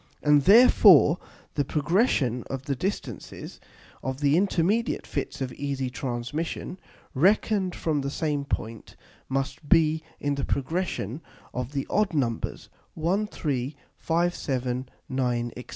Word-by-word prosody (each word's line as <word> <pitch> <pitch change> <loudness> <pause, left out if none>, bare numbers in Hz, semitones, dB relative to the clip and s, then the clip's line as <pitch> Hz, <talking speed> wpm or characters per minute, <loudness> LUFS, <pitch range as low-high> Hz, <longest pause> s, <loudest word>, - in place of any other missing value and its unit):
And 150 -1 +5
therefore 195 - +7 0.3
the 145 - +1
progression 145 - +1
of 135 -1 -4
the 140 0 -2
distances 130 - -5 0.4
of 130 0 -4
the 145 0 +3
intermediate 200 +4 +1
Fits 140 -1 -4
of 130 -1 -3
easy 135 -2 -3
Transmission, 130 - -4 0.3
reckon'd 190 +4 +2
from 155 -3 -1
the 140 - -2
same 150 -1 -1
point, 115 -5 -5 0.3
must 135 +2 -3
be 160 -2 +4 0.2
in 145 0 0
the 140 -1 -3
progression 145 - -2 0.3
of 125 +2 -4
the 135 -1 -2
odd 205 -4 +1
Numbers 120 -6 -2 0.3
1, 185 +7 0
3, 140 - -3 0.2
5, 170 +2 +1
7, 130 -1 -2 0.2
9, 120 -2 -1
&c. 125 - -8
145 Hz, 130 wpm, -26 LUFS, 130-170 Hz, 0.4 s, therefore